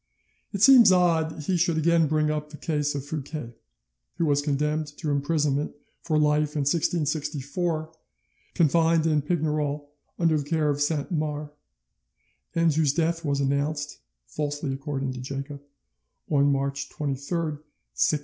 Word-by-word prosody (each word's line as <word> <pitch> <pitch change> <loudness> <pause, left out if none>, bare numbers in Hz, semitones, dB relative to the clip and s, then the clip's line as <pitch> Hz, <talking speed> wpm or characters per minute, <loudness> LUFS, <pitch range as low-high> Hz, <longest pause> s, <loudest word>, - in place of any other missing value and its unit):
It 200 -1 -1
seems 245 -6 +8
odd 170 -3 +3
that 155 -1 -8
he 185 - +1
should 170 -1 +1
again 165 0 +3
bring 155 0 +1
up 150 0 -3
the 150 - -10
case 150 -3 -1
of 140 -1 -4
Fouquet, 145 -4 -5 0.6
who 170 - +1
was 145 -2 +2
condemned 150 +1 -1
to 155 -4 -2
imprisonment 145 0 0 0.3
for 155 -3 0
life 150 0 +2
in 150 - +1
1664, 155 +1 -1 0.6
confined 165 0 +3
in 155 -2 +2
Pignerol 150 -2 -1 0.3
under 165 -3 +2
the - - -3
care 155 -3 +2
of 145 0 -3
Saint 145 +1 0
Mars, 150 -2 -2 1.0
and 165 -2 +3
whose 150 -2 +2
death 165 0 0
was 140 -2 0
announced 145 +2 -1 0.3
(falsely 145 - -3
according 135 -1 -3
to 125 - -7
Jacob) 140 +2 -6 0.7
on 140 -1 +4
March 140 0 -2
23rd, 150 +2 -3 0.3
1680. 150 - +2
150 Hz, 145 wpm, -26 LUFS, 145-160 Hz, 1.0 s, seems